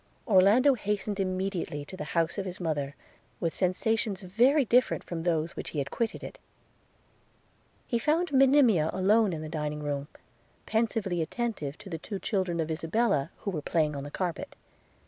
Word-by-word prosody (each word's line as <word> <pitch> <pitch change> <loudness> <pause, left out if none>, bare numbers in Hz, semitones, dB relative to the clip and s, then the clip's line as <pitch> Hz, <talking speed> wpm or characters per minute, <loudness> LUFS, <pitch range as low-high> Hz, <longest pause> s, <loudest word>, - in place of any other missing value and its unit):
Orlando 215 +7 +6
hastened 210 -3 -2
immediately 185 -6 -2
to 185 - -9
the 185 - -5
house 165 +4 +1
of 195 - -3
his 180 - -6
mother, 145 -5 -2 0.4
with 165 -2 -1
sensations 200 +2 0
very 245 +10 +3
different 250 +3 +3
from 170 -2 -5
those 165 -1 0
which - - -5
he - - -7
had 140 -1 -2
quitted 230 -2 -2
it. - - -8 0.8
– - - -37
He 235 - 0
found 320 +7 +1
Monimia 260 - +5
alone 200 +3 +3
in 155 -2 -4
the - - -5
dining 150 -1 -3
room, 145 -1 -2 0.6
pensively 220 -5 0
attentive 165 - -3
to 210 - -13
the 165 -4 -5
two 200 +4 -5
children 185 -4 -1
of 160 0 -1
Isabella, 165 -1 +1
who 200 - -2
were 155 -5 -3
playing 150 -1 0
on 140 - -4
the 145 - -6
carpet. 175 +1 -4
185 Hz, 170 wpm, -29 LUFS, 160-220 Hz, 0.8 s, Orlando